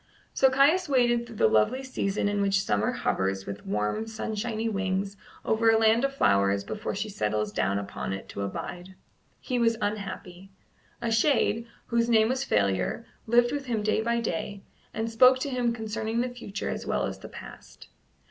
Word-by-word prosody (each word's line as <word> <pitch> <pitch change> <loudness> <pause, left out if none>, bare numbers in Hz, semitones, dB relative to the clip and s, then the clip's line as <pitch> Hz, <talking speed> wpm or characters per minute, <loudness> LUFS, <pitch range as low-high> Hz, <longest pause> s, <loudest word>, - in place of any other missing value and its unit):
So 265 - +5
Caius 290 +7 +3
waited 240 -3 +2
through 230 - -11
the 110 - +4
lovely 110 - +2
season 205 -6 -1
in 205 0 0
which 195 -1 +2
summer 105 +1 +1
hovers 95 0 -1
with 100 0 -7
warm 105 - -1
sunshiny 220 0 -3
wings 195 -1 -1 0.3
over 225 +1 +3
a 225 - +5
land 225 +2 +4
of 275 0 0
flowers 100 - +3
before 110 - -4
she 205 +2 -2
settles 105 - -1
down 100 -1 0
upon 100 -1 -4
it 95 0 -5
to - - -6
abide. 175 - -6 0.4
He 250 -2 -2
was 230 -1 +2
unhappy. 195 -3 -5 0.5
A 230 - 0
shade, 230 -1 +2 0.2
whose 235 0 +1
name 220 -1 +4
was 260 +1 0
Failure, 100 - 0 0.2
lived 240 +1 +4
with 285 -1 -4
him 225 -3 -1
day 215 +1 +1
by 235 +1 0
day, 200 0 -4 0.3
and 225 +1 -3
spoke 255 +3 +6
to 280 - -2
him 245 -2 +1
concerning 225 0 -2
the 250 - -1
future 235 -5 -5
as - - -4
well - - 0
as - - -5
the - - -10
past. - - -12
220 Hz, 180 wpm, -27 LUFS, 175-235 Hz, 0.5 s, spoke